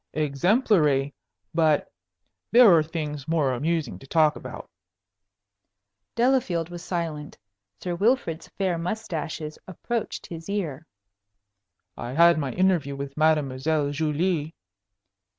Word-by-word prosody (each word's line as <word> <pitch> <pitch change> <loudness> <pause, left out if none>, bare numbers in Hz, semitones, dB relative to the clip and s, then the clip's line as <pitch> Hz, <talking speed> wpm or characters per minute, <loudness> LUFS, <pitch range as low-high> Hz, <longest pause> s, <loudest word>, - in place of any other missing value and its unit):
"Exemplary. 150 - +2 0.4
But 155 -3 +2 0.6
there 235 -5 +8
are 160 - +5
things 150 -3 -5
more 155 -5 +1
amusing 145 - -2
to 135 - -14
talk 155 0 +3
about." - - -8 1.5
Delafield 235 -9 +1
was 175 0 -7
silent. 160 -5 -4 0.4
Sir 180 - -3
Wilfrid's 185 -4 0
fair 185 -4 -2
mustaches 165 -5 -4
approached 225 +5 -4
his 165 +1 -9
ear. 165 -7 -3 1.1
"I 120 +1 -6
had 170 +2 +5
my 140 -3 -2
interview 180 -7 +1
with 140 0 -6
Mademoiselle 150 -1 +1
Julie." 155 +1 -1
160 Hz, 105 wpm, -25 LUFS, 145-180 Hz, 1.5 s, there